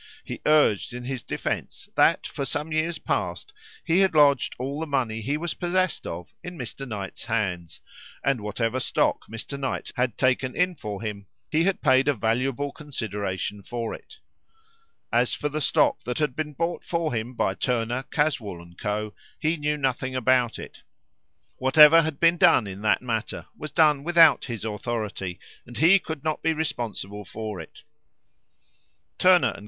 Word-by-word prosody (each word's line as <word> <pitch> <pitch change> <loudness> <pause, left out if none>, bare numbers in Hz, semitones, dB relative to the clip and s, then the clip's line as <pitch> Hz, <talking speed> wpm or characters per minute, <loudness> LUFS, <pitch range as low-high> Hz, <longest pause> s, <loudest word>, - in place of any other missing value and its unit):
He - - -7
urged 145 -8 +3
in 125 - -6
his 130 -1 -4
defence - - -4
that, - - +3
for 140 - -4
some 150 +3 -3
years 155 +2 0
past, - - -3 0.3
he 165 +3 +3
had 190 -4 +3
lodged 145 -3 +4
all 135 +4 -4
the 160 - -3
money 120 -6 -1
he 140 +7 -1
was 170 +1 -3
possessed 185 0 -1
of 85 +1 -7
in 180 -1 -7
Mr. 135 +1 -6
Knight's 100 -4 -6
hands, 90 -7 -2 0.4
and 135 -5 +1
whatever 115 +4 -1
stock - - 0
Mr. 115 +5 -6
Knight 135 -1 -3
had 125 -3 0
taken 130 0 +1
in 180 0 +2
for 105 - -6
him, 100 -3 -5 0.2
he 160 +2 +3
had 195 -1 0
paid 130 -2 +4
a 145 - +3
valuable 125 +6 0
consideration 105 - -4
for 115 +2 -4
it. 440 - -12 1.0
As - - +2
for 150 - -2
the 155 +2 -3
stock - - +3
that 125 - -3
had 150 -5 0
been 150 -1 -3
bought 165 +3 -2
for 165 -4 -1
him 115 +2 -3
by 95 - +1
Turner, 120 +3 -1
Caswall, 125 - -1
and 85 0 -14
Co., 105 0 -2 0.2
he 160 +1 0
knew 150 -1 -1
nothing 130 -1 -1
about 125 -1 +2
it. - - -10 0.8
Whatever 150 +5 +7
had 155 -3 -3
been 170 +1 +4
done 170 - +5
in 100 0 -7
that 110 +3 +2
matter 115 -2 -3
was 155 0 -7
done 150 -3 +4
without 165 -2 +6
his 115 -5 -5
authority, 105 -4 -4 0.3
and 120 -1 -9
he 170 - +6
could 160 -5 -6
not 155 -1 -1
be 160 - +2
responsible 120 -9 -4
for 105 0 -6
it. 80 - -11 1.4
Turner 180 -1 +5
and - - -5
Co. - - -10
130 Hz, 170 wpm, -25 LUFS, 110-155 Hz, 1.4 s, Whatever